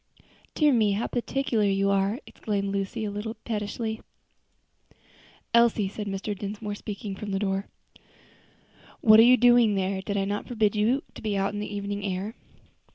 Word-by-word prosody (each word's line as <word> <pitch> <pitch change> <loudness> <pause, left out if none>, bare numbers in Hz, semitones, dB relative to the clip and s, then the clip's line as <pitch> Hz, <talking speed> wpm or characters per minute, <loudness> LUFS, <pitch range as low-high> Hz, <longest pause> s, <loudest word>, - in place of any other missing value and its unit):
"Dear 300 -3 +4
me, 215 -4 +3
how 210 +4 -1
particular 245 -2 -1
you 195 0 +2
are!" 200 +4 +1
exclaimed 200 -2 -3
Lucy 200 +3 -2
a 205 - -3
little 215 +2 -5
pettishly. 220 0 -3 1.5
"Elsie," 235 -3 +4
said 205 +1 -6
Mr. 200 +1 -3
Dinsmore, 205 +1 -5
speaking 205 -1 -6
from 205 +2 -7
the 195 - -1
door, 195 0 -1 1.3
"what 215 -1 +7
are 230 +2 +8
you 255 - +7
doing 240 -3 +5
there? 190 0 -1
Did 200 +1 -3
I 195 - +1
not 205 +1 -3
forbid 220 -3 +1
you 230 +6 +2
to - - -10
be 210 -3 -1
out 195 +1 0
in 205 - -4
the 210 - -5
evening 200 0 -4
air?" 195 +2 -3
205 Hz, 165 wpm, -26 LUFS, 200-225 Hz, 1.5 s, are